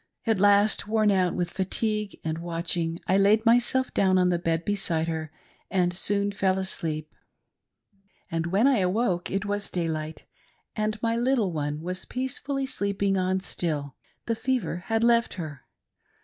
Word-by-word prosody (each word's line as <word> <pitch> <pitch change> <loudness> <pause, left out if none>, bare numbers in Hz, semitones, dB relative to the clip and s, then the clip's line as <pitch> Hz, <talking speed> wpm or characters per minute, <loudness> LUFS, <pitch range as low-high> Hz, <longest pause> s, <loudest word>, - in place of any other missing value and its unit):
At 225 -4 +2
last, 205 +1 +4
worn 215 -1 +3
out 185 -2 +2
with 175 -1 -2
fatigue 210 +2 -2
and 160 0 -2
watching, 170 0 -2
I 190 +1 +3
laid 210 +3 +4
myself 245 +3 +3
down 190 -1 +3
on 180 -1 +3
the 175 -1 +1
bed 165 -1 -1
beside 170 -6 0
her, 160 -2 -3 0.4
and 180 -2 +1
soon 200 +2 +1
fell 190 -1 +1
asleep; 155 -5 -3 1.2
and 165 0 -1
when 195 +7 +2
I 270 -5 +4
awoke 185 -1 0
it 195 +1 -2
was 205 0 -3
daylight, 160 -3 -3 0.5
and 215 0 -1
my 230 0 +1
little 240 -5 +1
one 150 0 -2
was 180 +2 -4
peacefully 270 +2 -3
sleep 200 -6 -3
ing 195 -1 +3
on 185 0 0
still 150 -6 -3 0.2
— - - -41
the 230 - 0
fever 230 -7 -1
had 225 0 +1
left 235 0 +3
her. 155 -7 -7
190 Hz, 165 wpm, -26 LUFS, 170-215 Hz, 1.2 s, last